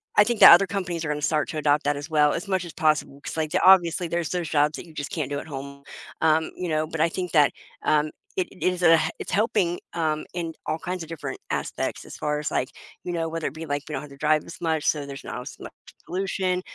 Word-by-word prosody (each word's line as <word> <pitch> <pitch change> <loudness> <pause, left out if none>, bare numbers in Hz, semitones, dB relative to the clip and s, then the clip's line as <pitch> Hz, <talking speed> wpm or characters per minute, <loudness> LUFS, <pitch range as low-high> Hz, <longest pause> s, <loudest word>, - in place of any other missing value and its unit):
I 205 - +8
think 235 0 -1
the - - +12
other 185 +3 +9
companies 180 -4 -3
are - - -2
gonna 150 0 -2
start 150 0 +1
to 155 - -4
adopt 145 0 +2
that 145 0 +1
as 145 +2 -6
well, 150 -2 +4
as 185 +4 -4
much 190 -2 0
as 170 - -9
possible, 155 -2 0
'cause, - - -6
like, 155 -1 -1
the - - +1
obviously, 180 -2 +5
there's 170 -1 -2
those 175 -3 -2
jobs 150 0 +2
that - - -8
you 160 - -15
just 145 -1 -5
can't 150 -5 -2
do 145 - -2
at - - -8
home, 140 0 -8 0.4
um, 160 0 +3
you 180 - -4
know, 155 -1 0
but 160 0 -6
I 165 +2 +3
think 180 +1 -4
that, 150 -3 +5 0.3
um, 150 0 +2 0.3
it 185 -2 0 0.2
is 180 -1 0
a 165 -1 +7 0.2
it's - - -6
helping, 195 -4 +1
um, 155 -2 -1
in 170 -2 -3
all 155 - -1
kinds 180 0 -4
of 160 - -11
different 165 -3 -6
aspects, - - -3
as - - -10
far 150 0 -1
as, 150 - -2
like, 130 - 0 0.3
you 175 - -4
know, 165 -1 -1
whether 165 0 -3
it 135 - -5
be 160 +1 -7
like 145 -1 -2
we 150 - -6
don't - - -2
have 150 - -10
to 140 - -13
drive 155 +1 +2
as 170 - -10
much, 160 -2 0
so 150 -2 +1
there's 140 0 -8
not 125 - -5
as 125 - -9
much - - -9 0.3
pollution, 185 0 -1
160 Hz, 265 wpm, -25 LUFS, 150-175 Hz, 0.4 s, the